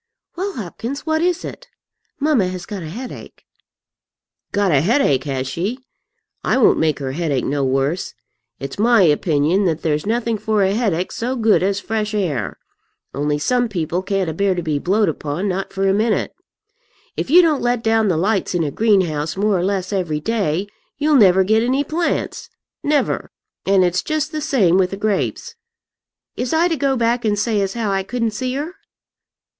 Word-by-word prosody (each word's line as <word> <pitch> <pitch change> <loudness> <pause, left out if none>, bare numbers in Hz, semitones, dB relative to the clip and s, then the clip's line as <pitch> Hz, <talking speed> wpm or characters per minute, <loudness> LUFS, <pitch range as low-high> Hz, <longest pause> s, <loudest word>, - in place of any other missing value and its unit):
"Well, 385 +3 -3
Hopkins, 235 - -6
what 315 0 +1
is 355 0 0
it? - - -9 0.5
Mamma 280 -10 +2
has 185 -1 -5
got 205 -3 -6
a 160 - -6
headache." 245 +9 -9 1.1
"Got 200 -2 +1
a 140 -3 +4
headache, 165 - +2
has 135 -2 -2
she? 185 - -2 0.7
I - - +2
won't 260 - +4
make 155 -3 +1
her 135 -2 -4
headache 145 -3 -1
no 140 0 0
worse. 135 +6 -1 0.4
It's 135 +8 -6
my 230 -1 +5
opinion 160 +3 +2
that 165 -2 -1
there's 150 +2 0
nothing 230 -1 0
for 215 -1 +1
a 190 +1 +2
headache 200 -6 0
so 250 +3 -2
good 225 -3 +3
as 195 +2 0
fresh 215 0 -2
air. 155 - -2 0.6
Only 145 +1 0
some 245 +10 +1
people 175 -2 -2
can't 195 -1 -1
abear 190 +4 0
to 175 - -3
be 155 -3 -1
blowed 200 +7 +2
upon, 155 +4 -2
not 190 0 -2
for 195 0 0
a 190 - +3
minute. 215 +2 0 0.8
If - - -3
you 350 +5 +7
don't 310 -4 +2
let 240 -1 0
down 225 -1 +2
the 175 -5 +1
lights 195 +1 0
in 170 - +1
a 145 - -2
greenhouse 175 -7 +1
more 205 +1 +2
or - - -1
less 190 0 -1
every 170 -6 -1
day, 195 -2 -1 0.3
you'll 300 +2 +1
never 190 -7 +6
get 220 +3 +3
any 260 +4 +1
plants, 330 +4 -2 0.3
never; 290 0 0 0.4
and 195 -1 +4
it's 180 0 +1
just 310 0 -2
the 310 -1 -3
same 195 - +3
with 185 -1 +2
the 195 - -5
grapes. 215 - -2 0.8
Is 245 +2 -2
I 330 +2 +4
to 330 - +1
go 275 -3 0
back 235 +1 +1
and 210 -2 +1
say 210 0 +1
as 195 +1 -2
how 225 -4 -1
I 195 0 +1
couldn't 230 +3 -2
see 255 +4 -3
her?" 300 +5 -4
200 Hz, 185 wpm, -20 LUFS, 170-240 Hz, 1.1 s, you